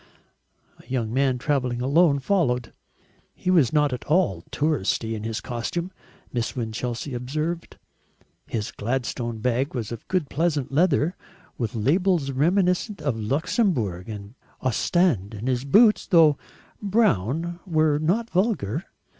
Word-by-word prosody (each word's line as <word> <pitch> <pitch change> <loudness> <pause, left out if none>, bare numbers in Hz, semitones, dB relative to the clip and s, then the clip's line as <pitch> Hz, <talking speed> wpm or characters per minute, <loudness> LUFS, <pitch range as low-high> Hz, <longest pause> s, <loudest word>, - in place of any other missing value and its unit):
A - - -19
young 120 -4 -2
man 130 -1 +2
travelling 125 -2 -1
alone 140 +4 +4
followed. 130 - 0 0.6
He 185 - -1
was 160 -10 +4
not 150 -3 +2
at 125 - -5
all 155 - +2
"touristy" 120 -6 0
in 110 - -4
his 110 0 -3
costume, 170 +9 -3 0.4
Miss 120 -2 -2
Winchelsea 120 +3 -3
observed; 155 +7 -3 0.7
his 105 -3 -3
Gladstone 120 0 -3
bag 125 +4 -1
was 115 -3 -3
of 115 - -7
good 180 -6 0
pleasant 150 -3 -1
leather 160 +2 +2 0.4
with 115 -2 -2
labels 155 - +2
reminiscent 180 - +1
of 140 -5 -1
Luxembourg 120 - 0
and 105 0 -8 0.3
Ostend, 130 - +1
and 110 +4 -5
his 130 0 0
boots, 210 - +5
though 160 -4 +6 0.5
brown, 170 - +1
were 155 -3 +2
not 190 +9 +1
vulgar. 180 - 0
140 Hz, 130 wpm, -24 LUFS, 120-170 Hz, 0.7 s, though